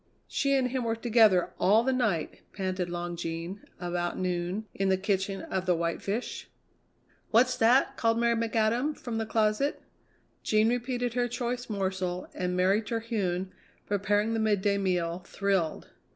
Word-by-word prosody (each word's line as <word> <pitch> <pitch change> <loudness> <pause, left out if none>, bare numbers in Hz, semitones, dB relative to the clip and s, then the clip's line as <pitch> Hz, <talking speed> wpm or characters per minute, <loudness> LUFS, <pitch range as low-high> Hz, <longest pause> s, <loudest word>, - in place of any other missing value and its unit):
"She 275 -1 +1
and 260 -2 +2
him 255 0 -2
were 225 -1 0
together 225 -5 +4
all 215 +4 +5
the 265 +1 +1
night," 215 -11 -1
panted 185 -2 -2
Long 175 0 -4
Jean, 170 +3 -5 0.2
about 175 0 -2
noon, 180 +3 -2
in 195 0 0
the 190 - +3
kitchen 195 0 -1
of 190 -1 -3
the 180 - +4
White 170 0 -2
Fish. 215 +5 -4 0.8
"What's 250 +3 +4
that?" 240 +4 +4
called 225 0 +2
Mary 235 0 +3
McAdam 230 +5 +1
from 230 -2 -4
the 220 - -2
closet. 220 +6 +1 0.6
Jean 215 +1 +3
repeated 245 0 -1
her 245 0 +1
choice 245 +1 -3
morsel, 190 -3 -2
and 180 0 -2
Mary 190 +4 +3
Terhune, 210 -5 -2 0.3
preparing 205 +2 +1
the 225 - 0
midday 205 -2 +2
meal, 175 -3 0
thrilled. 195 -5 -1
205 Hz, 150 wpm, -29 LUFS, 185-230 Hz, 0.8 s, all